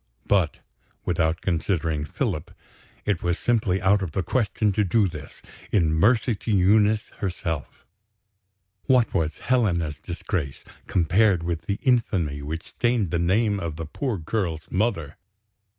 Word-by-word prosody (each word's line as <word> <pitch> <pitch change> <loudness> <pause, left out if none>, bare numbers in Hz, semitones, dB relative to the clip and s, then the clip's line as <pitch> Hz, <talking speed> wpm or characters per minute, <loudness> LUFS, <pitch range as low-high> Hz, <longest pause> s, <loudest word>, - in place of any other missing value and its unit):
But, 95 -6 +2 0.5
without 80 -2 0
considering 80 -4 -1
Philip, 75 0 -3 0.6
it 100 -5 0
was 85 0 0
simply 105 -6 +1
out 100 +2 +3
of 85 -5 -4
the 95 - 0
question 105 0 +1
to 105 +2 +1
do 100 +2 +3
this, 75 -5 -10 0.3
in 85 -6 +3
mercy 110 +8 +3
to 115 - -7
Eunice 105 +2 +3
herself. 85 -7 -4 1.0
What 125 -3 +3
was 80 -3 0
Helena's 85 -12 0
disgrace, 85 -5 -4 0.2
compared 90 +1 +3
with 85 -1 -3
the 100 - 0
infamy 95 - +1
which 80 +3 -5
stained 120 -7 0
the 85 - +1
name 100 +4 +2
of 85 -4 -4
the 80 +1 -5
poor 115 - -3
girl's 85 -2 -2
mother! 90 -7 -1
90 Hz, 135 wpm, -25 LUFS, 80-105 Hz, 1.0 s, out